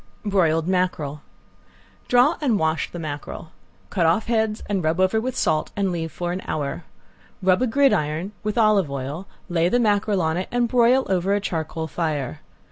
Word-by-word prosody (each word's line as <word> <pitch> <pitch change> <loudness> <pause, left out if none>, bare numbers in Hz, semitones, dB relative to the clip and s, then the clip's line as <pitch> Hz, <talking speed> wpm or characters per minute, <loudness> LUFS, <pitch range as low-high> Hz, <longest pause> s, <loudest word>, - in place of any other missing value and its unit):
~BROILED 165 -5 +2
MACKEREL~ 180 -6 -1 0.9
Draw 250 +7 +4
and 250 -8 +2
wash 160 -2 0
the - - -8
mackerel. 155 0 -6 0.4
Cut 175 -5 +2
off 170 +7 +2
heads 220 -2 0
and 195 -3 -1
rub 160 +3 0
over 185 +4 +3
with 255 +1 -3
salt 155 -1 +1
and 195 -2 0
leave 165 -2 -3
for 175 0 -3
an 185 +1 -3
hour. 150 +2 -3 0.6
Rub 185 +2 +3
a 255 - +2
gridiron 195 - +1
with 210 +1 -3
olive 215 -7 +4
oil, 140 +7 -5 0.2
lay 175 -1 +1
the 245 - +2
mackerel 205 -4 +2
on 160 +1 0
it 185 - -3
and 245 0 +1
broil 250 +2 +4
over 190 +1 +1
a - - +1
charcoal 160 -4 -3
fire. 150 -4 -3
185 Hz, 175 wpm, -23 LUFS, 160-215 Hz, 0.9 s, Draw